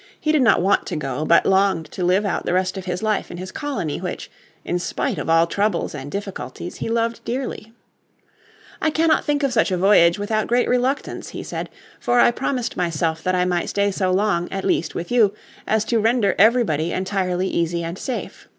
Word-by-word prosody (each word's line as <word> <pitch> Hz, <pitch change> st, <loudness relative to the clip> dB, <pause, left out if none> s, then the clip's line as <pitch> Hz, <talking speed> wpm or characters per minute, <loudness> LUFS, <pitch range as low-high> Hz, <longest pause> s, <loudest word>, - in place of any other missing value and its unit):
He 305 Hz, -, +1 dB
did 305 Hz, -3 st, +3 dB
not 225 Hz, -7 st, +4 dB
want 195 Hz, +2 st, +2 dB
to 180 Hz, -, -3 dB
go, 145 Hz, -1 st, -3 dB
but 170 Hz, -, +4 dB
longed 190 Hz, -4 st, +2 dB
to 185 Hz, -, -4 dB
live 185 Hz, +4 st, +2 dB
out 195 Hz, -, -1 dB
the -, -, -1 dB
rest 185 Hz, +1 st, 0 dB
of 190 Hz, -1 st, -6 dB
his 180 Hz, +2 st, -3 dB
life 215 Hz, -2 st, 0 dB
in 175 Hz, -, -7 dB
his 185 Hz, +1 st, -7 dB
colony 275 Hz, -, -3 dB
which, -, -, -5 dB, 0.3 s
in 175 Hz, -, -1 dB
spite -, -, -2 dB
of -, -, -4 dB
all 165 Hz, 0 st, +5 dB
troubles 200 Hz, +1 st, -1 dB
and 140 Hz, -1 st, -7 dB
difficulties, 195 Hz, -1 st, -6 dB
be -, -, -3 dB
loved 230 Hz, 0 st, -1 dB
dearly. 245 Hz, -3 st, -4 dB, 1.1 s
"I 315 Hz, -, +2 dB
cannot 315 Hz, 0 st, +2 dB
think 290 Hz, -1 st, 0 dB
of 275 Hz, -2 st, +1 dB
such 220 Hz, -, +3 dB
a 185 Hz, -, 0 dB
voyage 175 Hz, -2 st, +5 dB
without 215 Hz, +1 st, -1 dB
great 245 Hz, +1 st, +2 dB
reluctance," 250 Hz, +3 st, -1 dB
he -, -, -7 dB
said. -, -, -5 dB, 0.3 s
"For 245 Hz, 0 st, +2 dB
I 240 Hz, -, +6 dB
promised 245 Hz, -1 st, -2 dB
myself 165 Hz, -2 st, -1 dB
that 185 Hz, +2 st, 0 dB
I 180 Hz, 0 st, +2 dB
might 175 Hz, -1 st, -1 dB
stay 200 Hz, 0 st, +1 dB
so 190 Hz, -1 st, -1 dB
long, 185 Hz, -2 st, +1 dB
at 195 Hz, 0 st, -4 dB
least, 160 Hz, -, 0 dB
with 170 Hz, -, -5 dB
you, 215 Hz, -4 st, +3 dB, 0.3 s
as 215 Hz, 0 st, +1 dB
to 230 Hz, 0 st, +1 dB
render 220 Hz, -2 st, +2 dB
everybody 200 Hz, -8 st, +3 dB
entirely 185 Hz, -1 st, -1 dB
easy 170 Hz, -1 st, -1 dB
and 165 Hz, +1 st, -4 dB
safe. 250 Hz, +6 st, -6 dB
195 Hz, 205 wpm, -21 LUFS, 175-230 Hz, 1.1 s, I